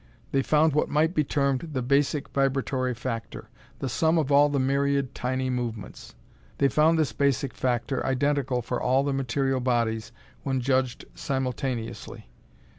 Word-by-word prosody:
They 135 - +2
found 155 +2 +3
what 150 - +1
might 155 +3 +2
be 155 - +2
termed 140 +2 0
the 130 -2 -1
Basic 140 +3 +1
Vibratory 135 -2 0
Factor 115 -1 -6 0.3
the 135 - -3
sum 160 +6 +2
of 145 -3 0
all 145 +1 +6
the 145 - -1
myriad 140 0 +1
tiny 130 +1 -2
movements. 120 -4 -5 0.4
They 140 - +3
found 155 +5 +3
this 150 -8 +1
Basic 140 0 0
Factor 125 +1 -1
identical 135 -2 0
for 125 +1 -3
all 130 +2 +2
the 140 0 -1
material 135 0 0
bodies 115 -3 0 0.3
when 135 -1 -1
judged 130 -1 0
simultaneously. 130 - -4
135 Hz, 150 wpm, -26 LUFS, 125-140 Hz, 0.4 s, all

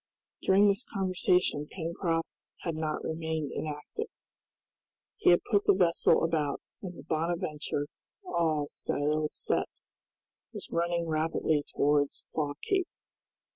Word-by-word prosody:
During 195 +2 +5
this 200 +4 +2
conversation 180 -5 +1
Pencroft 165 -1 -1 0.3
had 170 - -2
not 155 -1 -2
remained 160 -2 -2
inactive. 150 -1 -4 1.1
He - - +4
had 175 - +6
put 205 -2 +2
the - - +6
vessel 175 -3 +4
about, 155 -4 +1 0.2
and 180 -3 -7
the - - -10
"Bonadventure," 155 -2 -1 0.4
all 160 - +1
sails 150 +2 -1
set, - - 0 0.8
was - - -8
running 170 0 +1
rapidly 155 -1 +1
towards 145 0 +2
Claw 145 -2 0
Cape. 380 -3 +1
160 Hz, 115 wpm, -30 LUFS, 150-175 Hz, 1.1 s, had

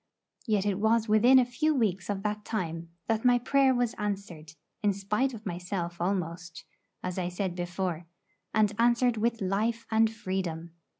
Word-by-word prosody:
Yet 210 -3 +1
it 200 -1 0
was 225 +1 +2
within 225 +5 +6
a 255 - +5
few 300 +6 0
weeks 200 -8 0
of 200 -1 -2
that 210 0 -2
time 170 -7 -4 0.2
that 225 -1 0
my 245 -1 +5
prayer 265 +2 +3
was 245 -2 0
answered, 195 -7 -4 0.3
in 205 -2 +2
spite 210 +7 0
of 220 0 -11
myself 175 -1 -4
almost, 175 -2 -3 0.4
as 180 +1 -3
I 180 -1 -1
said 180 0 -2
before, 175 -1 -3 0.4
and 215 -1 +2
answered 240 0 +3
with 230 +1 0
life 215 +5 0
and 220 0 +4
freedom. 185 -6 -4
205 Hz, 165 wpm, -29 LUFS, 180-230 Hz, 0.4 s, within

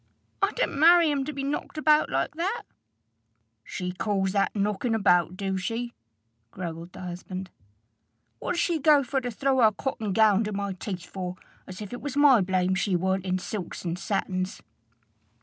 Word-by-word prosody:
"I - - +3
didn't 475 - -1
marry 335 0 +7
him 275 -2 -1
to 305 - -3
be 275 -1 -5
knocked 285 +2 -3
about 305 0 +4
like - - -1
that." 370 +9 -2 1.0
"She 180 +8 -4
calls 190 0 -1
that 200 +2 +1
knocking 210 +3 0
about, 180 -4 +3
do 190 -1 -2
she?" 230 +5 -3 0.6
growled 170 +2 -7
the - - -9
husband. 185 +1 -6 0.9
"What - - -2
did 340 - 0
she 340 -3 +1
go 290 -1 +5
for 270 +1 -1
to 250 - -3
throw 265 +3 0
her 220 -2 +6
cotton 220 -2 -3
gownd 215 +1 +4
in 210 - -4
my 200 -1 -2
teeth 185 -1 -6
for, 180 -2 -5 0.3
as 185 +2 -8
if 205 - -9
it 245 - -6
was 285 -1 -4
my 280 -6 +6
blame 185 0 +1
she 190 0 0
warn't 190 +1 0
in 185 0 0
silks 185 -1 -6
and 170 +1 -2
satins?" 190 -2 -2
205 Hz, 180 wpm, -27 LUFS, 185-270 Hz, 1.0 s, marry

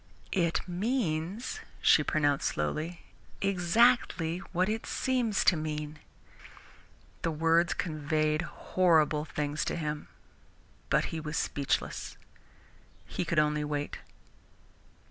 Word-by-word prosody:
"It 170 -3 +1
means," 195 - -1 0.2
she - - +5
pronounced 145 -2 +1
slowly, 155 - -2 0.4
"exactly 185 -2 +3
what 185 +1 +1
it 220 +2 -2
seems 245 -6 +1
to - - +5
mean." 150 -1 -4 1.2
The - - 0
words 165 +2 +2
conveyed 155 -1 0
horrible 160 -4 +2
things 150 0 -2
to - - -1
him, 150 -2 -3 0.8
but - - +3
he 160 - -2
was 155 0 -4
speechless. 140 -1 -2 0.9
He - - -3
could 165 -1 -2
only 150 0 +3
wait. 145 -1 -3
160 Hz, 105 wpm, -30 LUFS, 150-180 Hz, 1.2 s, she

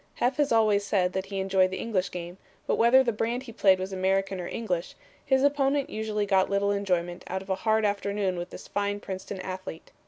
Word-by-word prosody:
Heff 250 +3 +1
has 290 -1 +1
always 215 -3 +4
said 190 -3 +1
that 190 0 -3
he 195 -1 -4
enjoyed 190 -1 +3
the 190 - -4
English 200 -5 -1
game, 175 +1 -7 0.3
but - - 0
whether 245 +3 +6
the 240 - +1
brand 235 +4 -2
he 245 - -9
played 195 -3 +4
was 190 +1 -5
American 190 0 0
or 175 - -5
English, 185 -7 -3 0.3
his 265 0 +2
opponent 285 0 +2
usually 215 -1 -2
got 195 -2 +2
little 200 0 +1
enjoyment 180 -3 -1
out 190 +1 -3
of 195 - -6
a 190 - -2
hard 220 0 +3
afternoon 200 -1 -1
with 175 0 -5
this - - -10
fine 205 0 -1
Princeton 190 0 -6
athlete. 185 -3 -7
200 Hz, 215 wpm, -27 LUFS, 185-220 Hz, 0.3 s, whether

